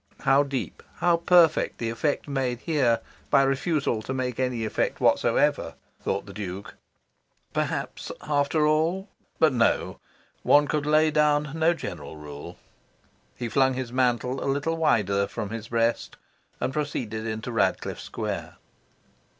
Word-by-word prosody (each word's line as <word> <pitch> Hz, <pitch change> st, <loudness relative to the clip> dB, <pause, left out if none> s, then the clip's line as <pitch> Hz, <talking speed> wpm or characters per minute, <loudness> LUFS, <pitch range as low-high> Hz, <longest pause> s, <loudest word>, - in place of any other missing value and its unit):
"How 135 Hz, +1 st, +4 dB
deep, 140 Hz, -2 st, -4 dB
how 175 Hz, -1 st, +3 dB
perfect, 170 Hz, -2 st, +4 dB
the 115 Hz, -1 st, -2 dB
effect 145 Hz, +7 st, -1 dB
made 130 Hz, -3 st, -2 dB
here 135 Hz, -8 st, +2 dB, 0.3 s
by 140 Hz, -, +5 dB
refusal 135 Hz, -3 st, 0 dB
to 130 Hz, +4 st, -4 dB
make 125 Hz, -2 st, -2 dB
any 125 Hz, -3 st, 0 dB
effect 110 Hz, -, -1 dB
whatsoever!" -, -, +2 dB, 0.3 s
thought -, -, -2 dB
the -, -, -10 dB
Duke. 100 Hz, -1 st, -6 dB, 0.8 s
Perhaps, -, -, -3 dB
after 150 Hz, +1 st, +1 dB
all... 165 Hz, +6 st, +1 dB, 0.3 s
but 155 Hz, -4 st, +4 dB
no: 115 Hz, -2 st, +1 dB, 0.4 s
one 145 Hz, 0 st, +5 dB
could 150 Hz, 0 st, -1 dB
lay 155 Hz, +1 st, +4 dB
down 150 Hz, -1 st, +2 dB
no 160 Hz, +1 st, +2 dB
general 80 Hz, -, -7 dB
rule. 75 Hz, -1 st, -9 dB, 0.8 s
He 120 Hz, -, -4 dB
flung 130 Hz, +3 st, +2 dB
his 125 Hz, -2 st, -4 dB
mantle 125 Hz, 0 st, +1 dB
a -, -, -1 dB
little 145 Hz, +4 st, 0 dB
wider 100 Hz, -, +2 dB
from 105 Hz, -, -5 dB
his 115 Hz, -1 st, -5 dB
breast, 115 Hz, 0 st, 0 dB, 0.4 s
and 130 Hz, -, -2 dB
proceeded 115 Hz, -7 st, -3 dB
into 110 Hz, +2 st, -4 dB
Radcliffe 115 Hz, -4 st, 0 dB
Square. -, -, -5 dB
135 Hz, 140 wpm, -26 LUFS, 115-150 Hz, 0.8 s, by